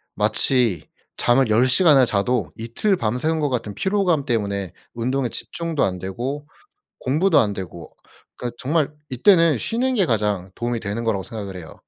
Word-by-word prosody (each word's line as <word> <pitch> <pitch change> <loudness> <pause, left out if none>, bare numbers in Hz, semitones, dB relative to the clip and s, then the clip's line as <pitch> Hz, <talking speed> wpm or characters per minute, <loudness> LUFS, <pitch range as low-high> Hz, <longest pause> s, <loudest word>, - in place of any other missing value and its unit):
마치 110 - +2 0.3
잠을 120 0 +2
10 115 +4 +4
시간을 140 -1 +6
자도 110 -1 0
이틀 120 - 0
밤새운 125 +9 -1
것 145 -2 0
같은 110 -5 -3
피로감 190 - 0
때문에 100 -5 -2 0.2
운동에 125 +2 -1
집중도 165 +2 -3
안 90 -1 -1
되고 130 - -5 0.5
공부도 155 +7 +2
안 105 -3 +1
되고. 90 -3 -9 0.4
그러니까 120 -1 -5
정말 150 +2 0 0.2
이때는 165 - +4
쉬는 250 - 0
게 195 - +3
가장 105 - -1
도움이 120 0 -2
되는 105 +2 -4
거라고 105 -5 -1
생각을 100 -4 -7
해요. 80 -3 -10
120 Hz, 330 characters per minute, -21 LUFS, 105-150 Hz, 0.5 s, 시간을